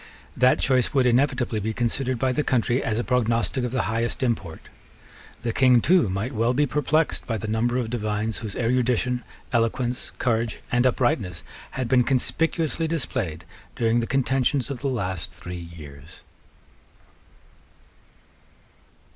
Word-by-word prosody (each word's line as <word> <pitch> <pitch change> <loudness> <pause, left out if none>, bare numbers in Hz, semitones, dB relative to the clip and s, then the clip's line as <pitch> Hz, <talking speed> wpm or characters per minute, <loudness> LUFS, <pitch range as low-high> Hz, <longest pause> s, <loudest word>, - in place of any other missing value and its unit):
That 125 +1 +4
choice 130 +1 +2
would 130 -2 +4
inevitably 125 -2 +2
be 110 +2 -3
considered 125 +2 0
by 130 +2 +1
the 150 +4 0
country 125 -1 +1
as 110 - -1
a 120 - 0
prognostic 120 +1 +1
of 125 - -2
the 130 - 0
highest 115 +4 -1
import. 95 -10 -2 0.8
The 115 -1 -1
King 125 -1 +5
too 170 - +3
might 95 +7 -2
well 115 +2 +1
be 145 +2 +3
perplexed 150 +3 0
by 115 - -1
the 110 - -5
number 115 +3 0
of 120 -3 -2
divines 110 -1 -2
whose 110 -4 -6
erudition, 125 0 +1 0.3
eloquence, 120 +2 0
courage, 115 -2 0
and 125 +1 +3
uprightness 100 -9 0 0.3
had 130 -2 -1
been 125 0 +4
conspicuously 160 +5 0
displayed 110 - -2 0.3
during 115 0 +2
the 115 - -2
contentions 135 0 +1
of 130 - -4
the 140 - -1
last 95 -7 -2
three 90 -1 -8
years. 70 0 -12
120 Hz, 145 wpm, -24 LUFS, 110-130 Hz, 0.8 s, King